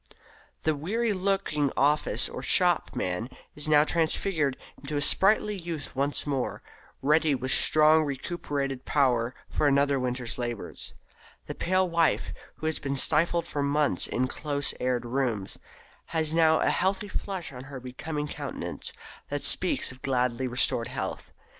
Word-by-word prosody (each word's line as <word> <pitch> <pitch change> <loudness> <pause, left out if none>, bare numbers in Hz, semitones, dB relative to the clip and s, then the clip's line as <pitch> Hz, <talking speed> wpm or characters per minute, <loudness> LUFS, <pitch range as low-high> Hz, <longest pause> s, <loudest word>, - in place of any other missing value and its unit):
The 155 - +2
weary 215 +9 -1
looking 185 -7 0
office 150 +2 +2
or - - -7
shop - - +3
man 90 +7 -2 0.3
is 150 +1 -1
now 150 -1 +6
transfigured 160 -3 0 0.2
into 145 +1 -4
a - - +2
sprightly 210 +7 +3
youth 165 -7 -6
once 140 +2 0
more, 135 -4 -2 0.4
ready 150 +1 +3
with 130 0 -2
strongly 155 +1 +5
recuperated 140 -2 -3
power 125 -4 +1
for 150 - +1
another 140 0 +3
winter's 125 -1 -3
labours. 120 -3 -5 0.5
The - - -5
pale 185 +1 +1
wife, 170 -2 +1 0.2
who - - -8
has 160 0 0
been 140 -1 -3
stifled 165 +5 +2
for 145 - -3
months 140 -8 +2
in 125 - 0
close 145 +1 -1
aired 125 -1 -1
rooms, 120 -6 -2 0.5
has 160 -1 -1
now 160 -1 +4
a - - +3
healthy 190 +3 0
flush 190 -6 -4
on 125 +1 -9
her 135 -1 -8
becoming 150 +4 -5
countenance - - -6 0.4
that - - -3
speaks - - +1
of 130 0 -14
gladly 125 -1 0
restored 120 -1 +1
health. 115 -7 -5
145 Hz, 145 wpm, -27 LUFS, 130-160 Hz, 0.5 s, now